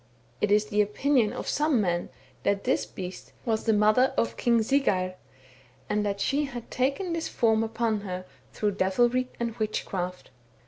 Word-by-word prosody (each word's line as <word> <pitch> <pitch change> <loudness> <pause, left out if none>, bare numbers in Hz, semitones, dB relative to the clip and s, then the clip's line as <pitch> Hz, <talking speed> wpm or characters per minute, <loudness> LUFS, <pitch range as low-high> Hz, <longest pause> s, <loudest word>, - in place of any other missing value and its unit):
It 210 - +2
is 210 +1 +4
the 210 0 +2
opinion 225 +2 +2
of - - -6
some 295 -4 +2
men 175 -4 0 0.3
that 200 0 0
this 110 0 +1
beast 180 +11 -8
was 220 -2 0
the 225 - +4
mother 215 +6 +4
of 230 - +1
King 235 -2 +2
Siggeir, 200 -8 +1 0.7
and 210 0 0
that 200 -1 -2
she 285 +8 +1
had 240 -4 -8
taken 275 +8 0
this 330 -1 -2
form 225 -2 +2
upon 225 -1 -1
her 185 -2 -5 0.3
through 210 -1 0
devilry 240 +7 +2
and 235 -1 -2
witchcraft. 185 - -3
215 Hz, 165 wpm, -27 LUFS, 200-245 Hz, 0.7 s, is